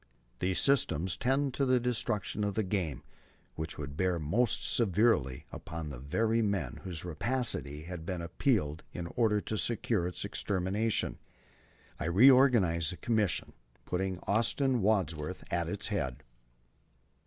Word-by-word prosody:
These 90 -1 0
systems 95 - +3
tend 135 +1 +1
to 140 - 0
the 130 -1 +3
destruction 110 -4 -1
of 100 -1 -1
the 110 - +1
game, 90 - -2 0.5
which 80 0 -5
would 70 -1 -6
bear 90 +1 +1
most 100 +10 +1
severely 100 - +2
upon 80 -1 -6
the 65 -4 -7
very 110 - +1
men 85 - -1
whose 90 -2 -6
rapacity 90 - -2
has 90 +1 -6
been 85 +2 -4
appealed 85 - 0
to - - -8
in 85 -1 -4
order 110 -3 +3
to 110 - -3
secure 110 -5 +1
its 90 - -3
extermination... 100 +3 -1 0.4
." - - -30
I - - -3
reorganized 100 - +5
the 90 - -7
Commission, 110 -6 0 0.3
putting 95 0 -2
Austin 120 +4 +1
Wadsworth 95 -5 0
at 85 -1 0
its 100 +4 -4
head. 65 - -3
95 Hz, 140 wpm, -31 LUFS, 80-115 Hz, 0.5 s, reorganized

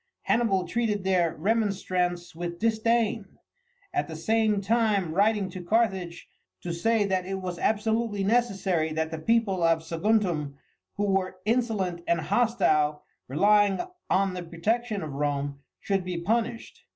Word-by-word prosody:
Hannibal 195 -6 +1
treated 220 -4 -1
their 180 -4 +1
remonstrance 185 -3 -1
with 170 +1 -5
disdain, 225 +1 0 0.6
at 365 - 0
the 160 - -7
same 215 +4 +1
time 205 -5 +1
writing 205 +1 +2
to 185 - -7
Carthage 190 -4 0 0.3
to 175 - -4
say 215 +5 +1
that 185 -2 -1
it 195 - -2
was 180 -2 -5
absolutely 220 -1 0
necessary 195 -7 +1
that 160 0 -2
the 160 - -4
people 205 0 +1
of 165 -1 +3
Saguntum, 165 -4 0 0.4
who 205 - 0
were 190 -2 0
insolent 215 -7 0
and 170 - +2
hostile, 155 -7 +1 0.2
relying 205 +7 +3 0.3
on 195 -1 +2
the 180 - -4
protection 205 +5 -2
of 150 -3 -6
Rome, 140 0 -2 0.2
should 195 -2 -1
be 180 -1 -4
punished. 225 +5 -2
195 Hz, 140 wpm, -27 LUFS, 170-220 Hz, 0.6 s, of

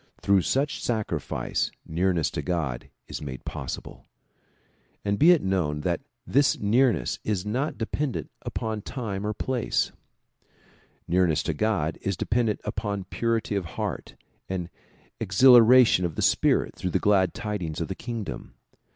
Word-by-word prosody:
Through 100 -1 +3
such 135 - -1
sacrifice 105 - -1 0.2
nearness 85 0 0
to - - -3
God 80 -9 -3 0.2
is - - -6
made 65 -4 -7
possible. - - -6 1.0
And 100 0 0
be 160 - +7
it 175 -3 +5
known 85 -6 0
that - - -1 0.2
this 140 +2 +3
nearness 115 0 +2
is 100 -3 -1
not 130 +8 -2
dependent 130 +4 -3
upon 110 -1 -3
time 105 -5 -4
or 105 - -1
place. 130 -3 -1 1.2
Nearness 85 -3 +2
to 80 - -1
God 80 -3 0
is 100 -2 -2
dependent 115 -2 0
upon 100 -2 -3
purity 115 -3 0
of 100 -3 -1
the - - -8
heart - - -4 0.3
and 90 -2 -3 0.5
exhilaration 120 0 +6
of 85 -3 -2
the - - -1
spirit - - +2
through 90 - -3
the - - +1
glad 95 -3 +2
tidings 105 -8 -4
of 85 - -2
the 95 - -3
kingdom. 115 0 -6
100 Hz, 140 wpm, -26 LUFS, 90-115 Hz, 1.2 s, be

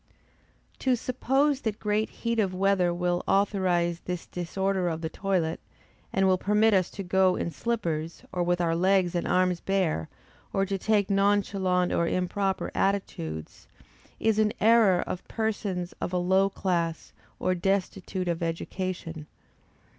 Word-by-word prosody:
To 260 -1 +2
suppose 270 +4 +1
that 215 -2 -2
great 210 +1 0
heat 230 -1 -2
of 190 -3 +1
weather 190 -2 +2
will 175 0 -1
authorise 180 -4 +1
this 180 -1 -5
disorder 185 +1 -1
of 160 -1 -4
the 160 -1 -3
toilet, 180 -5 -1 0.5
and 195 0 +2
will 185 -1 +3
permit 210 +3 +3
us 185 -2 +3
to 200 - -3
go 185 0 +3
in 170 - -2
slippers, 165 -6 -3
or 180 - -2
with 175 0 +1
our 165 -1 +1
legs 185 0 +2
and 175 - -1
arms 180 -1 +2
bare, 175 - 0 0.4
or 195 - +2
to 195 0 -2
take 205 0 +1
nonchalant 195 -2 +2
or 170 - +1
improper 190 +2 -1
attitudes, 80 - -2 0.5
is 220 -1 +2
an 215 -1 +2
error 220 -4 +5
of 180 - -6
persons 205 -5 -2
of - - -2
a - - +2
low 190 +2 +3
class, 170 -4 -2 0.3
or 185 - +1
destitute 190 0 -1
of 170 -1 -1
education. 165 -1 -4
185 Hz, 145 wpm, -27 LUFS, 175-200 Hz, 0.5 s, error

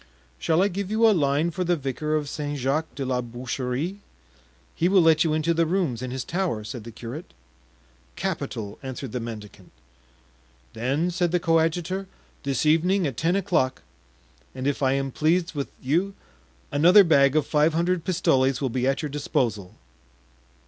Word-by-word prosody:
"Shall 165 +3 +2
I - - +3
give 195 0 -4
you 220 +2 +4
a - - +6
line 150 0 +1
for 180 +2 -2
the 175 0 +2
vicar 150 +1 -2
of 150 -2 -1
St. 145 0 -4
Jacques 140 +5 -1
de 135 - -3
la 125 -1 0
Boucherie? 125 - -4 0.7
he 175 - +1
will 195 0 +5
let 160 -1 +5
you 155 -2 +1
into 155 +2 +1
the 165 0 +1
rooms 165 -10 0
in 130 - -4
his 130 0 -4
tower," 170 - -2
said 110 +1 -7
the 115 - -8
curate. 120 +8 -9 0.8
"Capital," 105 -2 -4
answered 130 -2 -6
the 125 - -3
mendicant. 110 -3 -9 1.0
"Then," 140 +9 0
said 175 0 0
the 180 - +2
coadjutor, 170 +3 0 0.3
"this 140 0 -1
evening, 175 +5 +3
at 135 -5 -2
ten 165 +8 +1
o'clock, 175 -10 0 0.7
and 130 - -5
if 145 0 0
I 135 -1 +3
am 135 0 -1
pleased 165 +5 +1
with 140 -3 -3
you 175 +9 0 0.6
another 180 +8 +7
bag 140 -5 +4
of 155 - +3
five 155 +2 +2
hundred 170 0 +1
pistoles 135 -8 +2
will 135 - -1
be 125 +1 -1
at 135 +4 0
your 150 - -2
disposal." 115 -9 -2
150 Hz, 170 wpm, -25 LUFS, 130-175 Hz, 1.0 s, another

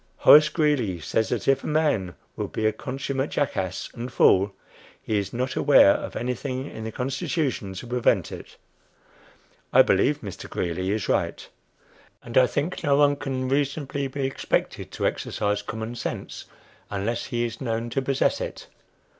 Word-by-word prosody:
Horace 150 +1 +8
Greeley 145 - +1
says 110 +7 -1
that 115 -5 -2
if 135 0 +3
a - - -5
man 145 - +1 0.2
will - - -3
be 110 - -3
a 110 - +4
consummate 135 +2 -3
jackass 95 -10 -2
and 120 +1 -6
fool, 100 -3 +4 0.5
he 105 -2 -1
is 100 - -4
not 125 +2 -2
aware - - +6
of - - -3
anything 130 +2 -3
in 110 -6 -8
the 110 - -4
Constitution 130 - -2
to 95 - -7
prevent 125 0 +1
it. - - -10 1.1
I - - +7
believe - - +2
Mr. - - -8
Greeley 90 +2 -2
is 105 0 -1
right; - - -1 0.8
and 120 - -9
I 130 -1 +6
think 155 +6 -3
no 145 -2 +3
one 145 0 +4
can 130 -2 -3
reasonably 140 0 -1
be 135 0 -3
expected 135 - -2
to - - -2
exercise 105 -1 -1
common 110 +2 -5
sense 120 - -5 0.4
unless 105 +4 -2
he 120 -2 -1
is 115 -1 -6
known 115 -1 -2
to 135 - 0
possess 135 0 +1
it. - - -6
125 Hz, 165 wpm, -25 LUFS, 110-140 Hz, 1.1 s, Horace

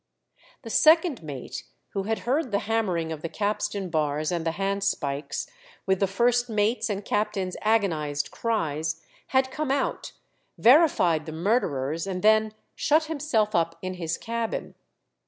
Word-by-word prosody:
The 225 - -7
second 320 - +5
mate, 145 -5 -7 0.3
who 195 -1 -3
had 225 +1 -1
heard 270 +3 +1
the 200 - +2
hammering 190 -7 0
of 155 -2 -5
the 165 - -4
capstan 205 -2 -2
bars 155 0 0
and 170 -2 -2
the 165 - 0
handspikes, 195 -7 -2 0.4
with 190 -1 +2
the 195 - +2
first 240 +5 +2
mate's 220 +1 +1
and 205 -1 -3
captain's 205 -3 -1
agonized 160 -10 0
cries, 160 -8 -2 0.2
had 260 0 +2
come 305 0 -3
out, 275 +1 -1 0.4
verified 230 - +4
the - - -4
murderers, 160 - 0
and 185 -2 -3
then 215 0 +4 0.2
shut 310 +2 +2
himself 280 -9 0
up 165 -2 +1
in 185 0 -3
his 170 -2 -3
cabin. 230 0 -3
200 Hz, 145 wpm, -26 LUFS, 165-230 Hz, 0.4 s, second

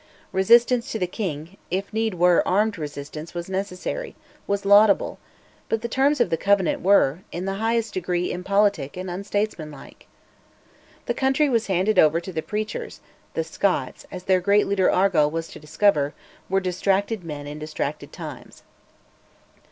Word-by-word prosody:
Resistance 235 +5 +4
to - - -2
the 185 - 0
king 180 -2 -5
if 195 +3 -3
need 220 -2 0
were, 175 0 +4
armed 205 0 +1
resistance 150 +2 -7
was 175 0 -4
necessary, 190 - -4 0.3
was 200 0 -1
laudable, 205 +1 +5 0.5
but 225 0 -1
the - - -1
terms 275 +4 +2
of 240 - +2
the 165 - +2
Covenant 200 0 +2
were, 175 -5 +4
in 180 +2 -4
the 195 - -1
highest 225 0 0
degree 180 -1 -1
impolitic 190 -5 0
and 185 0 -5
unstatesmanlike. 185 -6 -4 1.0
The - - 0
country 270 +2 +2
was 230 -3 +1
handed 190 +3 +2
over 155 +1 +5
to 180 +2 -8
the 160 - -2
preachers; 215 +4 -5 0.4
the 165 - 0
Scots, 180 +4 -2
as 180 -1 -7
their 185 -1 +2
great 200 +3 +3
leader 195 -2 +2
Argyll 180 -6 +3
was 165 +1 -4
to - - -11
discover, 150 -2 +1 0.3
were 195 +1 +2
"distracted 195 +2 0
men 150 -3 -6
in 145 +1 -7
distracted 150 -1 -4
times." - - -10
190 Hz, 155 wpm, -24 LUFS, 165-210 Hz, 1.0 s, laudable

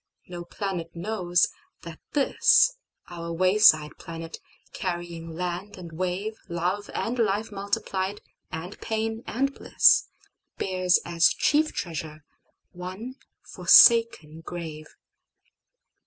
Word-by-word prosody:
No 175 -1 -7
planet 175 -3 -5
knows 175 -1 +1 0.4
that 165 -1 -10
thisOur 270 - +1
wayside 185 -5 +4
planet, 165 0 -8 0.3
carrying 170 -2 -5
land 180 +4 -5
and 175 -2 -10
wave, 185 +6 -4
Love 180 +4 -2
and 240 +2 -2
life 215 0 0
multiplied, 200 0 -3 0.3
and 165 +5 -7
pain 225 +1 -3
and 275 +4 -1
bliss, - - +4 0.5
Bears, 185 -1 +1
as 170 0 +3
chief 305 +1 +1
treasure, 155 -2 -6 0.5
one 185 +9 -8 0.3
forsaken 230 -10 +5
grave. 160 -3 -7
180 Hz, 95 wpm, -25 LUFS, 170-210 Hz, 0.5 s, forsaken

